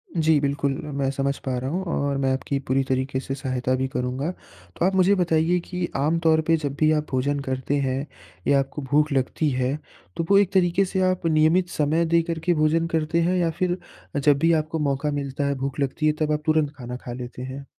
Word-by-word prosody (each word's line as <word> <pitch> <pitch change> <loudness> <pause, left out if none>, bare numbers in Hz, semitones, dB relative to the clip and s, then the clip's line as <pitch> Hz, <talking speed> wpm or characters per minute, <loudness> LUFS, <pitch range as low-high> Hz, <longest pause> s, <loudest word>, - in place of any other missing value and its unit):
जी, 160 -2 +3
बिल्कुल 140 0 0
म 150 - -6
मैं 135 -1 +1
समझ 140 0 -1
पा 130 -1 -1
रहा 130 +2 -3
हूँ 185 +4 -2
और 140 -1 0
मैं 130 - +2
आपकी 135 +1 -2
पूरी 135 +1 +2
तरीक़े 130 0 0
से 135 0 -4
सहायता 130 -2 -2
भी 130 +1 -1
करूँगा। 130 +5 -2
तो, 95 - -7
आप 190 0 +2
मुझे 190 +2 +4
बताईए 170 0 +2
कि 180 -1 -2
आमतौर 160 +2 +2
पे 165 0 +4
जब 145 -2 -4
भी 155 0 +4
आप 150 -1 +1
भोजन 140 +2 0
करते 130 +2 -1
हैं 130 +2 -1 0.4
या 140 -1 +5
आपको 135 +2 -3
भूख़ 150 0 +3
लगती 135 +3 0
है 130 +2 0 0.4
तो 165 - -1
वो 200 - +6
एक 200 -1 +3
तरीक़े 185 +1 +3
से 190 0 -1
आप 180 -2 -4
नियमित 165 +3 +3
समय 155 +3 +1
दे 170 +1 +3
कर 165 -1 -2
के 175 - +4
भोजन 160 +1 +2
करते 165 +1 0
हैं 180 +2 +1
या 170 -2 +2
फ़िर 180 0 +1 0.4
जब 145 0 +4
भी 165 +2 +3
आपको 160 +1 -5
मौक़ा 145 0 0
मिलता 140 0 -2
है 140 - 0
भूख़ 135 +2 -3
लगती 140 +3 -1
है 150 - +3
तब 155 -1 +1
आप 150 0 0
तुरंत 155 -2 +2
खाना 125 -1 -6
खा 120 - -5
लेते 125 0 -7
हैं? 130 +2 -7
150 Hz, 225 wpm, -24 LUFS, 135-165 Hz, 0.4 s, वो